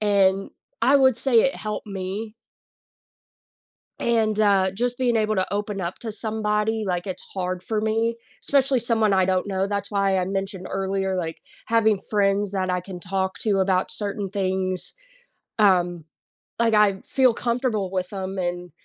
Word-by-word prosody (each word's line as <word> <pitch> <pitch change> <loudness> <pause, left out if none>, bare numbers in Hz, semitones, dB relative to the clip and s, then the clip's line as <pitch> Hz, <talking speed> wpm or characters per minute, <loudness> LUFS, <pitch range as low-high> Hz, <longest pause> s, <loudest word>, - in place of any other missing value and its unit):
and 195 -2 +2 0.3
I 265 +5 +5
would 260 -3 +4
say 240 -4 +4
it 270 - +1
helped 215 0 -5
me 200 +3 -5 1.7
and, 220 -2 +1
uh, 195 -3 +4
just, 245 +4 -2
being 245 -3 +2
able 215 0 +1
to 185 0 -1
open 205 -1 -2
up 170 +1 -4
to 225 - -5
somebody, 215 0 -1
like, 180 0 -1
it's 185 -2 -5
hard 185 -1 -3
for 215 -1 -2
me, 225 +1 +1 0.3
especially 270 -2 +2
someone 225 -3 +2
I 190 -1 +4
don't 185 0 +1
know, 195 0 0
that's 200 0 -3
why 195 -1 +2
I 185 - +1
mentioned 195 -1 -3
earlier, 190 0 -1
like, 165 -2 -4 0.3
having 220 -3 +3
friends 200 -1 +1
that 185 -1 -1
I 180 0 +1
can 180 -1 -9
talk 190 0 -2
to 200 -3 +1
about 185 -1 +1
certain 200 -1 -3
things, 185 -2 -1 0.7
um, 175 -5 +3 0.5
like, 230 -1 +3
I 205 -2 +4
feel 260 -3 +4
comfortable 235 -5 -1
with 185 0 -3
'em 190 -1 -4
and, 175 -1 -3
200 Hz, 160 wpm, -24 LUFS, 190-220 Hz, 1.7 s, I